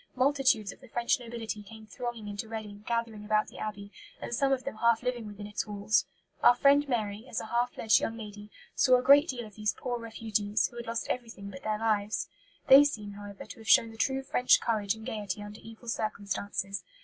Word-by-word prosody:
Multitudes 260 -5 +2
of - - -15
the 260 - -14
French 235 +1 +1
nobility 230 -3 -5
came 220 +1 -12
thronging 225 +1 -6
into 205 +2 -5
Reading, 210 -2 -7
gathering 230 -3 -2
about 215 0 +1
the - - -12
Abbey, 205 -1 -5 0.3
and - - -6
some 275 +3 +2
of 260 -1 +1
them 275 -5 -5
half 235 +1 +3
living 245 -3 -2
within 205 0 -8
its 210 +1 -3
walls." 210 +1 +1 0.3
Our 245 - +7
friend 280 +2 +4
Mary, 215 -1 -2
as 225 - -2
a - - -6
half 240 +1 0
fledged 220 -1 +4
young 225 - -3
lady, 210 -1 -9 0.2
saw 255 -1 +5
a 250 - -2
great 285 +4 +7
deal 245 -5 -4
of 210 - -13
these 210 0 -1
poor 245 -1 -3
refugees, 220 -2 -1
who 240 - -13
had 235 - -6
lost 230 0 -2
everything 225 -5 -5
but 185 - -10
their 215 0 -1
lives. 215 -1 0 0.4
They 275 +1 +10
seem, 210 -8 -2
however, 200 0 -9
to - - -11
have 225 - -8
shown 230 - +6
the - - -12
true 265 +4 0
French 250 -1 +4
courage 215 -3 0
and 220 0 -11
gaiety 210 -3 -4
under 205 +1 -9
evil 225 +2 -13
circumstances. 200 -3 -3
225 Hz, 215 wpm, -30 LUFS, 210-240 Hz, 0.4 s, They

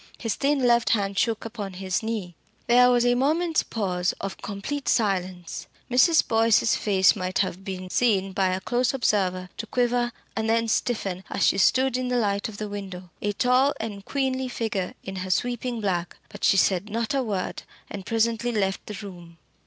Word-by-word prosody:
His 225 -3 -2
thin 275 -2 +1
left 235 -1 +4
hand 200 -1 -2
shook 230 -1 0
upon 210 -4 -6
his 185 0 -2
knee. 220 -6 -4 0.3
There 250 0 +6
was 245 -1 +3
a 245 - +4
moment's 315 +6 +2
pause 185 -4 -1
of 195 -1 -5
complete 240 +8 -4
silence. 185 -5 -1 0.2
Mrs. 315 +6 +5
Boyce's 225 0 +3
face 190 -3 +3
might 185 0 -3
have 190 -1 -1
been 185 -1 -5
seen 195 -6 +2
by 190 -1 +2
a 185 0 0
close 245 +6 0
observer 185 -7 0
to 225 - -5
quiver 245 0 +1 0.2
and 220 0 -1
then 230 0 +2
stiffen 200 -5 -1
as - - +1
she 195 - +3
stood 260 +4 +3
in 255 0 -2
the 250 0 0
light 205 -1 0
of 205 - -10
the 215 - -4
window, 190 -3 -7
a 205 0 -1
tall 250 +6 +3
and 205 -3 -5
queenly 260 +1 -1
figure 220 -6 -3
in 190 0 -6
her 185 0 -4
sweeping 240 +4 -1
black. 180 -4 -2
But - - -11
she 195 - +4
said 190 +2 +2
not 230 +3 -2
a 275 - +1
word, 205 -7 -3 0.3
and 200 -2 -7
presently 230 +2 0
left 195 -4 -1
the 210 - -6
room. 175 -3 -11
215 Hz, 185 wpm, -25 LUFS, 190-245 Hz, 0.3 s, There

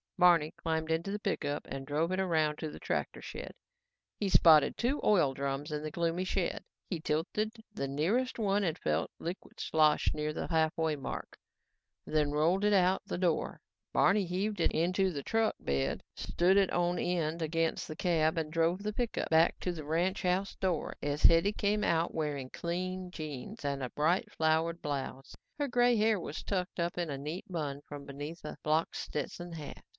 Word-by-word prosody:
Barney 170 -4 +5
climbed 160 -1 -2
into 165 +4 0
the 205 - -2
pickup 145 -8 -2
and 135 0 -5
drove 155 +5 0
it 185 - 0
around 160 -5 +1
to 155 - -3
the - - -10
tractor - - -2
shed. - - -7 0.7
He 205 - 0
spotted 160 -5 +6
two 260 +5 0
oil 170 -10 +4
drums 140 +2 -3
in 150 0 -2
the 155 - -4
gloomy 170 +3 -1
shed. 185 -1 -1 0.2
He 175 - -3
tilted 165 +8 -1 0.2
the 140 -10 -3
nearest 190 - 0
one 205 -2 +1
and 165 -4 0
felt 75 +1 0
liquid 175 +3 -7
slosh 155 -1 +3
near 150 0 -2
the - - -4
halfway 160 -1 +1
mark, 140 - -6 0.7
then 150 -2 +1
rolled 165 +7 +2
it 210 0 +4
out 185 -1 +4
the - - -3
door. 175 -3 0 0.3
Barney 200 -1 +4
heaved 195 +4 -2
it - - +3
into 185 +3 +2
the 140 -4 -5
truck 225 +5 +1
bed, 70 +1 -1
stood 185 +3 +2
it 195 -2 +4
on 175 0 +1
end 170 -2 -1
against 165 +1 0
the 155 - -6
cab 160 -2 +1
and 155 -2 -2
drove 170 +4 +1
the 210 0 -2
pickup 240 +1 -2
back 160 +1 +4
to 180 - -1
the 160 -3 -6
ranch 175 +5 0
house 185 +2 0
door 180 -5 -1
as 145 +1 -2
Hetty 165 +5 +6
came 210 0 +1
out 165 0 +1
wearing 145 -4 -2
clean 185 +2 -3
jeans 155 - -7
and 140 -1 -1
a 125 - -3
bright, 165 +5 +1
flowered 160 +1 +1
blouse. 135 -2 -4 0.2
Her 290 -1 0
gray 245 -1 +4
hair 215 -1 +3
was 165 -2 -6
tucked 185 -2 -2
in 170 0 -1
a 140 - -3
neat 150 +6 -5
bun 145 -5 -3 0.2
beneath 145 +4 -7
a 150 - -6
blocked 155 +2 +1
Stetson 175 +4 -4
hat. 150 -4 -8
165 Hz, 180 wpm, -32 LUFS, 150-185 Hz, 0.7 s, spotted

